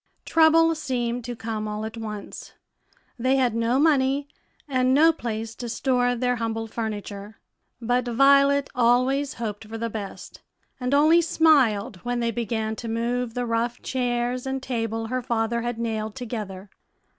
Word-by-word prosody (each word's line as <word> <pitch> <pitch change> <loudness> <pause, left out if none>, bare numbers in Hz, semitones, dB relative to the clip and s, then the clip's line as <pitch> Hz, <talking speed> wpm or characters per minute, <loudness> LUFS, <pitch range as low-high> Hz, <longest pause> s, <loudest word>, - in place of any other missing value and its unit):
Trouble 330 0 +5
seemed 245 -5 -2
to 240 0 -5
come 220 -1 -4
all 210 +1 -4
at 220 +1 -6
once; 215 -3 -7 0.7
they 255 +3 +2
had 255 -4 +2
no 230 +2 +1
money 280 -2 +2 0.4
and 255 -1 +2
no 320 +3 +6
place 225 -5 -4
to 240 0 -7
store 245 0 +1
their 245 0 0
humble 225 -1 -2
furniture; 210 -2 -6 0.4
but 245 +1 0
Violet 275 +3 +4
always 255 +3 +2
hoped 220 -2 -5
for 225 +1 -6
the 230 0 -3
best, 205 -3 -8 0.4
and 250 +2 0
only 315 +4 +5
smiled 260 - +3
when 245 +6 -3
they 235 -1 0
began 220 -1 -2
to 235 - -6
move 235 +1 -2
the 245 0 -1
rough 235 +1 -1
chairs 245 0 -1
and 265 0 -3
table 225 -3 -2
her 255 +3 -2
father 235 0 -1
had 240 0 -3
nailed 220 -2 -3
together. 210 -5 -6
240 Hz, 155 wpm, -24 LUFS, 225-260 Hz, 0.7 s, no